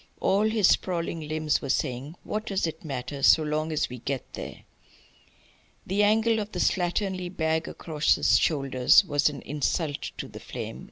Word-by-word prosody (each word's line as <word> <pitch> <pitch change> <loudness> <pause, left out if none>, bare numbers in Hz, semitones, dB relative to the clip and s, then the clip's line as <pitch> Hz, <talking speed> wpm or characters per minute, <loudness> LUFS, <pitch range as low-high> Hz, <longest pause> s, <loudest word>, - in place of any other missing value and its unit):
All 205 +3 +2
his 215 -4 +3
sprawling 170 -3 0
limbs 155 -1 0
were 140 - -6
saying: 130 +5 -2
"What 215 +1 -4
does 195 -3 0
it 160 0 -5
matter, 140 -1 -5
so 155 +3 +6
long 155 +1 -1
as 155 - 0
we 125 0 -8
get 135 +1 -3
there?" - - -8 1.2
The 195 +3 0
angle 220 +2 +3
of 210 0 -5
the 180 - -3
slatternly 185 +1 0
bag 160 -2 -1
across 150 -2 0
his - - +3
shoulders 135 +2 +4
was 145 -2 +2
an 145 -2 -8
insult 150 +1 -2
to - - -5
the - - -10
flame. - - -7
160 Hz, 170 wpm, -26 LUFS, 145-190 Hz, 1.2 s, so